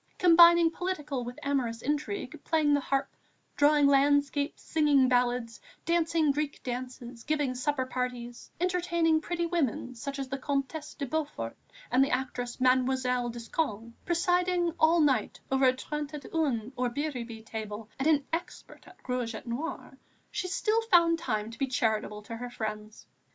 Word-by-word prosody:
Combining 340 Hz, -1 st, +7 dB
political 300 Hz, -8 st, -3 dB
with 245 Hz, +1 st, -7 dB
amorous 250 Hz, -5 st, -1 dB
intrigue, 300 Hz, +8 st, -3 dB
playing 310 Hz, -3 st, +2 dB
the 285 Hz, -, +4 dB
harp, 275 Hz, 0 st, -2 dB, 0.4 s
drawing 290 Hz, 0 st, +4 dB
landscapes, 285 Hz, +1 st, +2 dB
singing 290 Hz, -4 st, +3 dB
ballads, 245 Hz, -2 st, 0 dB, 0.2 s
dancing 330 Hz, -3 st, +2 dB
Greek 295 Hz, 0 st, -3 dB
dances, 250 Hz, -1 st, -6 dB
giving 295 Hz, -4 st, 0 dB
supper 260 Hz, +1 st, -1 dB
parties, 250 Hz, -2 st, -5 dB
entertaining 340 Hz, -3 st, +1 dB
pretty 345 Hz, +1 st, -2 dB
women, 300 Hz, -7 st, -1 dB
such 275 Hz, +4 st, -6 dB
as 270 Hz, -1 st, -4 dB
the 270 Hz, +1 st, -4 dB
Comtesse 285 Hz, +3 st, -3 dB
de 285 Hz, -, -3 dB
Beaufort 275 Hz, -, -3 dB, 0.4 s
and 255 Hz, +2 st, +5 dB
the 275 Hz, -, 0 dB
actress 250 Hz, -2 st, -3 dB
Mademoiselle 255 Hz, -1 st, +2 dB
Descoings, 230 Hz, -1 st, -3 dB
presiding 355 Hz, 0 st, +1 dB
all 325 Hz, +1 st, +5 dB
night 265 Hz, -8 st, +1 dB
long 265 Hz, -, +3 dB
over 260 Hz, -, +7 dB
a -, -, -9 dB
trente 300 Hz, +1 st, -5 dB
et 285 Hz, -, -8 dB
un 260 Hz, -8 st, 0 dB
or 250 Hz, 0 st, 0 dB
biribi 240 Hz, -5 st, -4 dB
table 215 Hz, -1 st, -6 dB
and 270 Hz, -, +1 dB
an 295 Hz, -3 st, +3 dB
adept 340 Hz, +2 st, -6 dB
at -, -, -16 dB
rouge 245 Hz, -3 st, -2 dB
et -, -, -8 dB
noir, 255 Hz, +8 st, -5 dB, 0.3 s
she 365 Hz, -, -3 dB
still 430 Hz, +4 st, +1 dB
found 340 Hz, -7 st, +4 dB
time 220 Hz, -8 st, -2 dB
to 230 Hz, -, -12 dB
be 275 Hz, -, +1 dB
charitable 215 Hz, -4 st, -1 dB
to 230 Hz, -, -7 dB
her 245 Hz, +1 st, -6 dB
friends. 215 Hz, -2 st, -6 dB
275 Hz, 155 wpm, -29 LUFS, 245-315 Hz, 0.4 s, Combining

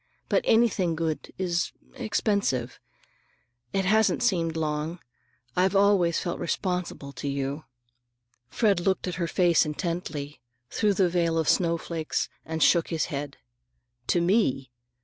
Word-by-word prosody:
But -, -, +2 dB
anything 215 Hz, -7 st, +3 dB
good 160 Hz, -1 st, -3 dB
is—expensive. 185 Hz, -, -1 dB, 0.9 s
It 195 Hz, -1 st, 0 dB
hasn't 220 Hz, +4 st, +3 dB
seemed 170 Hz, -8 st, +1 dB
long. 155 Hz, +1 st, -2 dB, 0.6 s
I've 185 Hz, +2 st, +2 dB
always 195 Hz, -4 st, +4 dB
felt 175 Hz, -, -3 dB
responsible 180 Hz, -5 st, -3 dB
to 140 Hz, +1 st, -6 dB
you." 140 Hz, +2 st, -3 dB, 0.8 s
Fred 205 Hz, -5 st, +2 dB
looked 190 Hz, +1 st, 0 dB
at 180 Hz, -, -2 dB
her 170 Hz, -, +1 dB
face 175 Hz, -1 st, +3 dB
intently, 150 Hz, -3 st, -4 dB, 0.3 s
through 210 Hz, -2 st, +1 dB
the 185 Hz, -1 st, +3 dB
veil 170 Hz, -2 st, +1 dB
of 160 Hz, -2 st, 0 dB
snowflakes, 165 Hz, -2 st, 0 dB
and 160 Hz, 0 st, -1 dB
shook 170 Hz, -2 st, +4 dB
his 165 Hz, -2 st, -1 dB
head. 140 Hz, 0 st, -4 dB, 0.7 s
"To 175 Hz, -, +2 dB
me? 170 Hz, -, +1 dB
170 Hz, 125 wpm, -26 LUFS, 155-190 Hz, 0.9 s, always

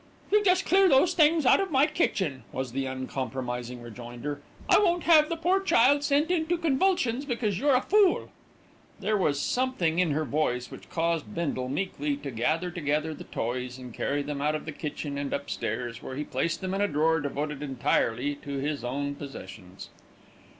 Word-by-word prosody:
"You 420 Hz, 0 st, +4 dB
just 370 Hz, -1 st, +3 dB
clear 385 Hz, 0 st, +5 dB
those 330 Hz, +6 st, +4 dB
things 315 Hz, -2 st, +4 dB
out -, -, +6 dB
of 390 Hz, -1 st, -1 dB
my 275 Hz, -2 st, +4 dB
kitchen," 190 Hz, -, -1 dB
was 130 Hz, -1 st, -4 dB
the 135 Hz, +1 st, -2 dB
uncompromising 125 Hz, -2 st, -4 dB
rejoinder. 120 Hz, +5 st, -7 dB, 0.3 s
"I -, -, +6 dB
won't 350 Hz, -4 st, +2 dB
have 310 Hz, -3 st, +6 dB
the 335 Hz, -, -1 dB
poor 360 Hz, +4 st, +2 dB
child 285 Hz, -5 st, +4 dB
sent 290 Hz, +3 st, +2 dB
into 345 Hz, 0 st, +1 dB
convulsions 290 Hz, -5 st, +1 dB
because 230 Hz, -8 st, -1 dB
you're 280 Hz, 0 st, +3 dB
a 255 Hz, -, +3 dB
fool." 410 Hz, -3 st, +3 dB, 0.7 s
There 215 Hz, +2 st, 0 dB
was 150 Hz, -8 st, +1 dB
something 185 Hz, -, 0 dB
in 180 Hz, -2 st, +3 dB
her 155 Hz, +1 st, 0 dB
voice 125 Hz, -3 st, -1 dB
which -, -, -11 dB
caused 165 Hz, -9 st, -1 dB
Bindle 140 Hz, -6 st, -2 dB
meekly 145 Hz, -2 st, -2 dB
to 140 Hz, -1 st, -6 dB
gather 160 Hz, +10 st, 0 dB
together 155 Hz, -2 st, -1 dB
the -, -, -10 dB
toys 125 Hz, +2 st, -3 dB
and 125 Hz, -2 st, -10 dB
carry 145 Hz, +4 st, -1 dB
them 145 Hz, -1 st, -4 dB
out 150 Hz, +1 st, +1 dB
of 155 Hz, -, -5 dB
the 155 Hz, -, -4 dB
kitchen 145 Hz, -1 st, -5 dB
and 140 Hz, -1 st, -3 dB
upstairs, 120 Hz, -3 st, -3 dB
where 130 Hz, -, -7 dB
he 150 Hz, -, -2 dB
placed 150 Hz, +6 st, -2 dB
them 185 Hz, 0 st, -3 dB
in 195 Hz, -, -1 dB
a 205 Hz, -, +3 dB
drawer 160 Hz, -1 st, +2 dB
devoted 145 Hz, 0 st, -3 dB
entirely 135 Hz, -1 st, 0 dB
to 140 Hz, -1 st, -6 dB
his 145 Hz, 0 st, -2 dB
own 140 Hz, +3 st, -2 dB
possessions. 95 Hz, -9 st, -10 dB
150 Hz, 185 wpm, -27 LUFS, -, 0.7 s, out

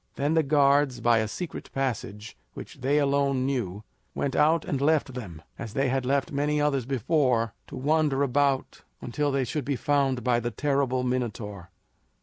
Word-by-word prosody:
Then 145 Hz, +3 st, 0 dB
the 160 Hz, -, +4 dB
guards, 140 Hz, -3 st, +3 dB
by 115 Hz, -1 st, +3 dB
a 110 Hz, -, 0 dB
secret 175 Hz, -, -6 dB
passage 115 Hz, -5 st, -3 dB, 0.2 s
which -, -, -10 dB
they 140 Hz, +3 st, +2 dB
alone 140 Hz, -2 st, +1 dB
knew, 110 Hz, -7 st, -2 dB, 0.3 s
went 140 Hz, -, -2 dB
out 160 Hz, +2 st, +3 dB
and 140 Hz, -2 st, -2 dB
left 145 Hz, -2 st, +2 dB
them, 90 Hz, -11 st, -8 dB, 0.2 s
as 115 Hz, -2 st, -7 dB
they 135 Hz, -1 st, +1 dB
had 130 Hz, -1 st, -1 dB
left 140 Hz, 0 st, +1 dB
many 150 Hz, +1 st, 0 dB
others 140 Hz, -4 st, 0 dB
before, 125 Hz, -4 st, +1 dB
to -, -, -9 dB
wander 145 Hz, 0 st, +1 dB
about 140 Hz, 0 st, 0 dB, 0.2 s
until 145 Hz, +4 st, -1 dB
they 135 Hz, -1 st, +1 dB
should 140 Hz, +4 st, -3 dB
be 140 Hz, +2 st, -1 dB
found 135 Hz, -3 st, +1 dB
by 120 Hz, -1 st, +2 dB
the 120 Hz, 0 st, -2 dB
terrible 135 Hz, -2 st, 0 dB
Minotaur. 105 Hz, -7 st, -3 dB
135 Hz, 170 wpm, -26 LUFS, 120-145 Hz, 0.3 s, the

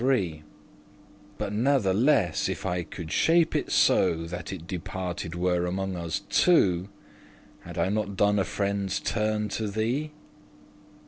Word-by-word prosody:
*divided 100 Hz, -12 st, +1 dB, 1.0 s
But 105 Hz, -1 st, -3 dB
natheless, 110 Hz, -, +2 dB
if -, -, -4 dB
I 90 Hz, -1 st, 0 dB
could 85 Hz, -1 st, -8 dB
shape* 165 Hz, 0 st, +3 dB
it -, -, -1 dB
so -, -, +4 dB
*contrive 85 Hz, 0 st, -6 dB
That 90 Hz, -1 st, -5 dB
it 90 Hz, -4 st, -7 dB
departed 90 Hz, -1 st, -5 dB
were 90 Hz, 0 st, +1 dB
among 95 Hz, +1 st, -2 dB
us 85 Hz, -2 st, -3 dB
two, 95 Hz, -, +3 dB, 0.7 s
Had -, -, -10 dB
I -, -, +1 dB
not 100 Hz, -1 st, -2 dB
done 105 Hz, +1 st, +3 dB
a -, -, +3 dB
friende's 100 Hz, -1 st, -1 dB
turn 105 Hz, -1 st, -1 dB
to 110 Hz, +1 st, -2 dB
thee?" 115 Hz, +9 st, -1 dB
95 Hz, 140 wpm, -27 LUFS, 90-110 Hz, 1.0 s, so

